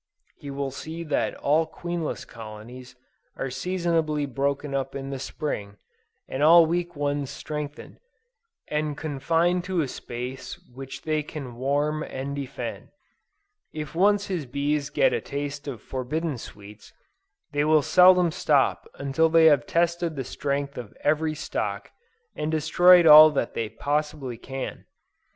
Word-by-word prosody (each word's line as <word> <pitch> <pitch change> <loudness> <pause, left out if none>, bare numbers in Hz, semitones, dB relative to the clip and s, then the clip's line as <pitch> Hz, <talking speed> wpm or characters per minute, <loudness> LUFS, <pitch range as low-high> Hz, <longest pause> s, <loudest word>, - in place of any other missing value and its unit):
He 145 - -10
will 140 -1 -3
see 160 +5 -7
that 150 -3 -1
all 155 +3 +1
queenless 175 -2 -4
colonies 115 +3 -11 0.4
are 135 - -4
seasonably 165 0 -1
broken 140 +1 -2
up 135 0 -2
in 135 0 -5
the 135 - -4
Spring, 105 -8 -5 0.5
and 130 - -4
all 165 +2 +8
weak 175 +1 -2
ones 145 -1 -2
strengthened, 150 +1 -7 0.7
and 150 -1 -2
confined 165 +4 0
to 180 -2 0
a 145 - -1
space 125 +1 -7 0.2
which 135 +1 -9
they 155 -1 0
can 140 -5 -8
warm 145 +4 0
and 140 -1 -5
defend. 140 -2 -6 0.8
If 150 -1 -6
once 200 +4 +3
his 175 -9 -3
bees 140 +2 -1
get - - +2
a - - -1
taste 145 +1 -5
of 120 -6 -6
forbidden 135 +2 -3
sweets, 105 0 -12 0.6
they 145 0 +1
will 155 -1 +4
seldom 180 0 +6
stop 150 -5 +1
until 140 +4 +1
they 165 0 +5
have 145 -6 +5
tested 170 -1 0
the 135 - -3
strength 140 +1 -3
of 115 -4 -10
every 155 +1 +1
stock, 160 - -4 0.4
and 150 - -2
destroyed 175 +3 +5
all 155 0 +11
that 140 -6 -2
they 110 -2 -3
possibly 145 -3 -3
can. 135 +1 -6
145 Hz, 140 wpm, -25 LUFS, 135-160 Hz, 0.8 s, all